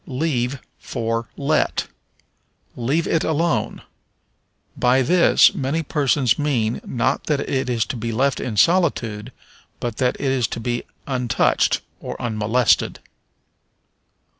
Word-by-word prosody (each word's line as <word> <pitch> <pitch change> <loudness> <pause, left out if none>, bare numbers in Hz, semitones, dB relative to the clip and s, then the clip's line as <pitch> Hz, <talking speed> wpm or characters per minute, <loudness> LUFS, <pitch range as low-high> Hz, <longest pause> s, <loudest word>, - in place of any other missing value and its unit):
Leave 135 -2 -1 0.2
for 115 0 -3
Let. 150 +2 0 0.9
"Leave 140 +8 0
it 165 - +1
alone." 160 +1 -1 0.9
By 125 +2 +3
this 175 +6 +5
many 140 +5 -1
persons 140 -5 +1
mean, 120 -7 0
not 120 - -1
that 150 -3 0
it 130 -1 -2
is 115 -2 +1
to - - -5
be 115 0 -3
left 130 +4 +1
in 115 -5 -4
solitude, 125 - +2 0.5
but 120 -3 -4
that 125 -1 +1
it 135 -2 0
is 125 -4 +1
to - - -5
be 120 +1 -3 0.2
untouched, 125 -3 +1 0.2
or - - -7
unmolested. 110 +1 +1
125 Hz, 120 wpm, -21 LUFS, 115-145 Hz, 0.9 s, this